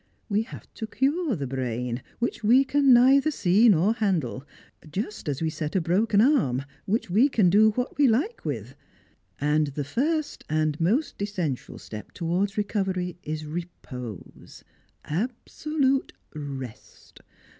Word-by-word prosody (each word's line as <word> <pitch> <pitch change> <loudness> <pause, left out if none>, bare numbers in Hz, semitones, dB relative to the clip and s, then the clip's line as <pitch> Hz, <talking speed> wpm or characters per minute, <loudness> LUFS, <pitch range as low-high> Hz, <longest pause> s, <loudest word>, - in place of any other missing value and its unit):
We 205 +1 +2
have 225 - -9
to 220 - -5
cure 280 +3 0
the 145 -5 -3
brain, 125 -1 -3 0.2
which 240 -1 -2
we 245 +6 +6
can 280 0 +3
neither 265 +4 +6
see 210 - +4
nor 195 +3 +4
handle, 180 - -1 0.5
just 205 -2 -4
as 145 +2 -2
we 160 - 0
set 155 +1 -4
a - - +4
broken 200 +5 +2
arm, 220 - +3 0.2
which 205 -2 -1
we 235 +10 +5
can 200 -9 +3
do 215 +3 +6
what 250 +4 -3
we 275 -5 +6
i 235 +6 +3
':e - - -4 0.2
with. 125 -5 -4 0.7
And 150 +1 +2
the 145 +1 -4
first 295 - -1
and 155 0 0
most 225 - 0
essential 180 -10 -3
step 105 -1 -9
towards 185 +4 -1
recovery 190 -4 -1
is 155 0 -5
repose, 140 - -8 0.4
absolute 265 - -1 0.2
rest. 135 -6 -9
190 Hz, 145 wpm, -26 LUFS, 150-240 Hz, 0.7 s, we